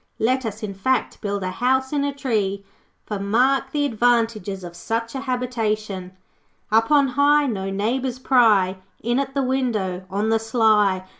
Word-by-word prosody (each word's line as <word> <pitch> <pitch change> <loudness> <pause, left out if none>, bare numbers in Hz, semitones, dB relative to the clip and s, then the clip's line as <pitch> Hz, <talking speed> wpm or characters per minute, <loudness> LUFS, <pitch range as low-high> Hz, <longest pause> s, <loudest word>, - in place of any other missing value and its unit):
Let 255 +2 +1
us, 215 +1 -7
in 205 -2 -4
fact, 260 +7 -1
build 200 -2 -2
a 185 - -2
house 260 +6 0
in 285 -1 +1
a 285 - 0
tree. 210 -8 -2 0.4
For, 210 -2 -4
mark 255 +7 +1
the 290 0 0
advantages 225 -6 0
of 175 -1 -9
such 230 +5 -3
a 270 - -3
habitation 215 -7 -3 0.6
'Up 225 +1 +3
on 285 -2 +4
high 285 +3 +3
No 195 -7 -2
neighbours 240 +6 -1
pry 220 -8 +3 0.3
In 240 +3 +1
at 270 0 -3
the 275 - +1
window, 215 -9 -1
On 205 +3 -1
the 225 0 +3
sly. 215 -4 +2
225 Hz, 165 wpm, -22 LUFS, 200-260 Hz, 0.6 s, on